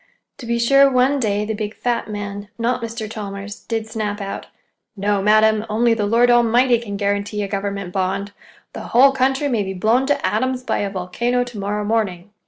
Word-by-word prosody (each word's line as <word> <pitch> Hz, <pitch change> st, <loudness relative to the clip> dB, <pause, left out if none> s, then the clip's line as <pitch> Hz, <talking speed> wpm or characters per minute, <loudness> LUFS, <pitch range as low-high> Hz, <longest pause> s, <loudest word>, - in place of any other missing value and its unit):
To 240 Hz, -, -8 dB
be 235 Hz, 0 st, 0 dB
sure, 275 Hz, +4 st, +5 dB
one 265 Hz, +2 st, +2 dB
day, 210 Hz, -3 st, 0 dB
the 220 Hz, -, -2 dB
big 215 Hz, 0 st, -4 dB
fat 240 Hz, -2 st, -2 dB
man, 205 Hz, -1 st, -5 dB
not 240 Hz, +1 st, 0 dB
Mr. 230 Hz, -1 st, -5 dB
Chalmers, 205 Hz, -1 st, -7 dB
did 225 Hz, -2 st, -3 dB
snap 215 Hz, -2 st, -4 dB
out: 195 Hz, -1 st, -6 dB, 0.5 s
"No, 200 Hz, 0 st, 0 dB
madam; 215 Hz, +1 st, +4 dB
only 230 Hz, +2 st, +2 dB
the 210 Hz, -2 st, -1 dB
Lord 240 Hz, +3 st, +4 dB
Almighty 240 Hz, +1 st, +4 dB
can 205 Hz, -4 st, -6 dB
guarantee 205 Hz, +1 st, -1 dB
a -, -, -3 dB
government 200 Hz, -2 st, -4 dB
bond—the 195 Hz, +1 st, -5 dB
whole 265 Hz, +4 st, +4 dB
country 270 Hz, +2 st, +1 dB
may 235 Hz, -6 st, 0 dB
be 190 Hz, -1 st, -4 dB
blown 230 Hz, +8 st, +2 dB
to 290 Hz, -, 0 dB
atoms 255 Hz, +4 st, 0 dB
by -, -, -1 dB
a 200 Hz, -, -1 dB
volcano 220 Hz, +7 st, -1 dB
to 245 Hz, -4 st, -9 dB
morrow 205 Hz, +1 st, -2 dB
morning!" 205 Hz, -4 st, -1 dB
215 Hz, 190 wpm, -20 LUFS, 200-240 Hz, 0.5 s, sure